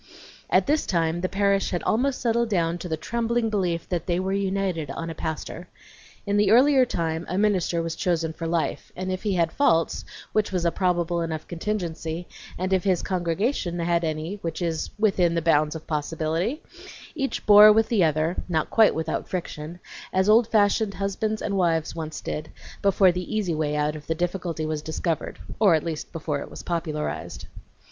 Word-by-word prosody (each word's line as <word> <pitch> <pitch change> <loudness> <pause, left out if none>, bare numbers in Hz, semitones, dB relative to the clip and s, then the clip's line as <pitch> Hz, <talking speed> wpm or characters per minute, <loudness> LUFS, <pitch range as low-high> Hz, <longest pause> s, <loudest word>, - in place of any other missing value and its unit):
At - - +4
this 300 +1 +1
time 170 -2 0
the 185 - -1
parish 200 0 +1
had 175 - -2
almost 260 +4 +1
settled 235 0 +1
down 170 -3 0
to 180 - -6
the 160 - -1
trembling 235 +4 -1
belief 180 -5 -1
that 175 -2 -2
they 175 -1 +1
were 190 +1 -1
united 190 -6 -1
on 165 +4 -4
a - - -5
pastor. 160 +2 -5 0.6
In 200 0 +1
the 205 - +3
earlier 260 +2 +5
time 165 -3 -2
a 185 - -1
minister 185 -5 +1
was 165 -1 -3
chosen 165 -3 0
for 165 +1 -5
life, 165 0 -2
and 185 +1 -3
if 185 - -3
he 205 -3 0
had 165 -2 +1
faults, 165 - +2 0.3
which 215 -1 +1
was 180 -2 -1
a 170 - +3
probably 175 -2 0
enough 160 -1 -4
contingency, 170 -3 -3 0.3
and 185 +1 -1
if 185 - +2
his 185 -4 +1
congregation 180 - -1
had 170 0 +1
any, 160 +4 -3
which 165 -5 -5
is 165 -3 -2
within 190 -5 +2
the - - +2
bounds 155 -1 +3
of 160 - -7
possibility, 165 - -2 0.5
each 275 -4 -3
bore 210 0 +9
with 220 +1 +3
the 215 -6 +3
other 155 +2 +1
(not 160 -3 0
quite 225 -1 +5
without 160 0 -3
friction), 170 -2 -5 0.3
as 190 +1 +2
old 220 +2 +5
fashioned 205 -1 +2
husbands 210 +2 -2
and 200 - -1
wives 165 -4 +1
once 160 -1 -5
did, 155 +1 -5 0.3
before 195 -1 +4
the 180 +4 -4
easy 200 -6 0
way 155 -1 -1
out 150 0 0
of 150 - -10
the 160 - 0
difficulty 175 -2 -2
was 155 -1 -2
discovered, 160 +1 -3 0.2
or 200 -6 +6
at 155 - 0
least 160 -3 -5
before 155 -3 -3
it - - -7
was - - -9
popularized. 160 -3 -3
175 Hz, 190 wpm, -25 LUFS, 160-200 Hz, 0.6 s, bore